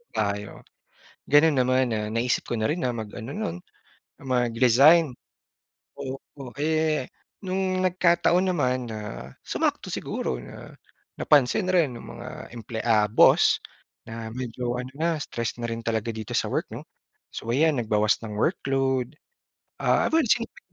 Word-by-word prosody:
tayo?" 105 -1 -1 0.8
Ganon 150 +2 +6
naman, 130 +1 +3
ah, 105 0 -2
naisip 115 +2 0
ko 120 - -1
na 110 - -1
rin 165 +7 0
na 125 - 0
mag 110 -3 -4
ano 115 +4 -7
no'n, 85 +1 -3 0.6
mag-resign. 125 +4 +4 0.8
Oo. 135 -1 -8
Eh, 155 -2 +1 0.4
no'ng 185 0 -1
nagkataon 180 0 +3
naman 130 -7 0
na, 110 -1 -5 0.4
sumakto - - -2
siguro - - -3
na - - -11 0.5
napansin 150 +7 +3
rin 170 -8 +2
ng 120 - -9 0.2
mga - - -8 0.3
emple 115 0 -6
ah, 110 -3 +3
boss 105 - +5 0.5
na 115 0 -6
medyo 125 -1 -3
ano 125 - -8
na, 165 +2 +1
stress 115 -4 -3
na 120 - -2
rin 115 0 -5
talaga 115 0 -1
dito 110 -2 -5
sa - - 0
work - - 0
'no? - - -7 0.5
So 115 - -5
'yan, 150 +1 +3
nagbawas 105 -2 +2
ng 105 - -6
workload. 135 - 0 0.6
Ah, - - +2
well 320 -2 +3
swinerte 230 +1 0
125 Hz, 140 wpm, -25 LUFS, 115-155 Hz, 0.8 s, Ganon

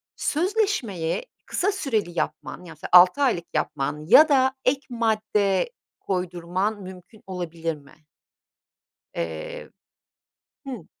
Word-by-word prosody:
sözleşmeyi 340 - 0 0.2
kısa 395 +3 0
süreli 220 - -2
yapman - - -4
ya 165 - -10
mesela 155 - -9
6 180 +9 +8
aylık 225 -11 +2
yapman 150 +2 -2
ya 310 - +8
da 265 -2 +4
ek 265 +2 +3
madde 215 - +1 0.3
koydurman 185 +3 -2
mümkün 185 +3 -12
olabilir 170 -3 -4
mi? 150 +2 -20 1.1
Eee, 80 -2 -5 1.0
hıı. 245 - -7
195 Hz, 105 wpm, -24 LUFS, 170-260 Hz, 1.1 s, 6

